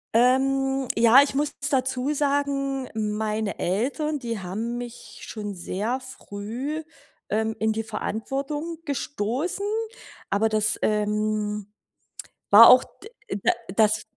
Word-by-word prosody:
Ähm, 270 Hz, +2 st, +2 dB
ja, 235 Hz, +5 st, +7 dB
ich 285 Hz, -, -3 dB
muss 290 Hz, +2 st, -1 dB, 0.2 s
dazu 260 Hz, +1 st, 0 dB
sagen, 275 Hz, -2 st, 0 dB
meine 215 Hz, -1 st, -2 dB
Eltern, 280 Hz, -, -1 dB
die 230 Hz, -4 st, -4 dB
haben 220 Hz, +6 st, -4 dB
mich 245 Hz, -1 st, -9 dB
schon 205 Hz, -3 st, -6 dB
sehr 210 Hz, +8 st, -2 dB
früh, 260 Hz, +4 st, -5 dB, 0.5 s
ähm, 220 Hz, +1 st, 0 dB
in 220 Hz, 0 st, +1 dB
die 220 Hz, -, -2 dB
Verantwortung 275 Hz, +9 st, -4 dB
gestoßen. 285 Hz, -, -2 dB, 0.6 s
Aber 210 Hz, +3 st, +2 dB
das, 215 Hz, 0 st, +1 dB
ähm, 210 Hz, -1 st, 0 dB, 0.8 s
war 225 Hz, +3 st, +10 dB
auch, 255 Hz, -, +8 dB
d 440 Hz, -, -15 dB, 0.3 s
da -, -, +5 dB, 0.3 s
das 215 Hz, -1 st, +3 dB
235 Hz, 115 wpm, -25 LUFS, 215-270 Hz, 0.8 s, war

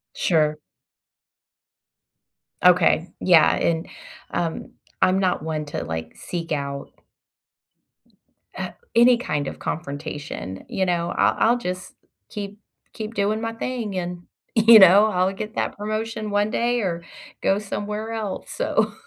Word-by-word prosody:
Sure. 155 Hz, -3 st, +2 dB, 2.1 s
Okay. 180 Hz, -1 st, +5 dB
Yeah, 170 Hz, -4 st, +5 dB
and, 165 Hz, 0 st, 0 dB, 0.4 s
um, 165 Hz, -2 st, -3 dB, 0.3 s
I'm 185 Hz, +1 st, +4 dB
not 185 Hz, -5 st, 0 dB
one 155 Hz, -1 st, -3 dB
to, 145 Hz, -, -4 dB
like, 80 Hz, 0 st, -5 dB
seek 170 Hz, -2 st, -6 dB
out 140 Hz, -1 st, -4 dB, 1.7 s
uh, -, -, -4 dB, 0.2 s
any 240 Hz, +1 st, +6 dB
kind 150 Hz, -, -2 dB
of -, -, -6 dB
confrontation, 145 Hz, -, -5 dB
you 190 Hz, -, 0 dB
know? 175 Hz, -1 st, 0 dB
I'll -, -, +3 dB
I'll 235 Hz, +2 st, +4 dB
just 185 Hz, -4 st, -5 dB, 0.4 s
keep 205 Hz, 0 st, -7 dB, 0.3 s
keep 215 Hz, 0 st, -6 dB
doing 210 Hz, +1 st, 0 dB
my 225 Hz, 0 st, -3 dB
thing, 225 Hz, -4 st, -4 dB
and, 175 Hz, -1 st, -4 dB, 0.3 s
you 225 Hz, 0 st, +8 dB
know, 195 Hz, +3 st, +8 dB
I'll 185 Hz, -2 st, +1 dB
get 215 Hz, +3 st, -6 dB
that -, -, -1 dB
promotion 215 Hz, +1 st, -3 dB
one 205 Hz, +1 st, +1 dB
day 240 Hz, +1 st, +1 dB
or 175 Hz, -4 st, -2 dB, 0.4 s
go 195 Hz, -, +2 dB
somewhere 210 Hz, +2 st, -4 dB
else 215 Hz, -4 st, -5 dB
so -, -, 0 dB
190 Hz, 130 wpm, -23 LUFS, 165-215 Hz, 2.1 s, you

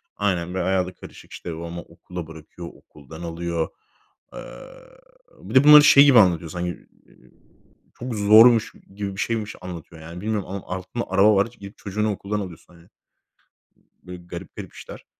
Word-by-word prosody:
aynen, 90 Hz, -3 st, -1 dB
böyle 95 Hz, -2 st, -2 dB
bayağı 95 Hz, -1 st, +1 dB
da 90 Hz, -, -9 dB
karışık. -, -, -14 dB
İşte, 85 Hz, -2 st, -7 dB
babamı 85 Hz, +1 st, -7 dB
okula 90 Hz, 0 st, -10 dB
bırakıyor. 80 Hz, +2 st, -11 dB
Okuldan 80 Hz, +3 st, -14 dB
alıyor. 85 Hz, -1 st, -3 dB, 0.6 s
Eee, -, -, -8 dB, 1.0 s
bir -, -, -9 dB
de 130 Hz, -, +7 dB
bunları 150 Hz, 0 st, +9 dB
şey 140 Hz, -1 st, +8 dB
gibi 130 Hz, -5 st, +7 dB
anlatıyor 85 Hz, -4 st, +3 dB
sanki, 90 Hz, 0 st, -3 dB, 0.4 s
eee, -, -, -23 dB, 0.8 s
çok 120 Hz, -2 st, -5 dB
zormuş 110 Hz, +2 st, +6 dB, 0.2 s
gibi 100 Hz, -1 st, -5 dB
bir -, -, -3 dB
şeymiş 110 Hz, -3 st, -3 dB
anlatıyor, 85 Hz, -2 st, -9 dB
yani, 85 Hz, +3 st, -9 dB
bilmiyorum 105 Hz, -2 st, -3 dB
ama 100 Hz, 0 st, -6 dB
altında 95 Hz, +6 st, -5 dB
araba 100 Hz, +2 st, +4 dB
var; 100 Hz, -, +3 dB
gidip 100 Hz, -3 st, -13 dB
çocuğunu 105 Hz, +1 st, -2 dB
okuldan 105 Hz, +1 st, -4 dB
alıyorsun 90 Hz, -2 st, -10 dB
hani. 85 Hz, +1 st, -20 dB, 1.2 s
Böyle 90 Hz, -1 st, -10 dB
garip -, -, -9 dB
garip -, -, -9 dB
işler. -, -, -12 dB
95 Hz, 160 wpm, -23 LUFS, 85-105 Hz, 1.2 s, bunları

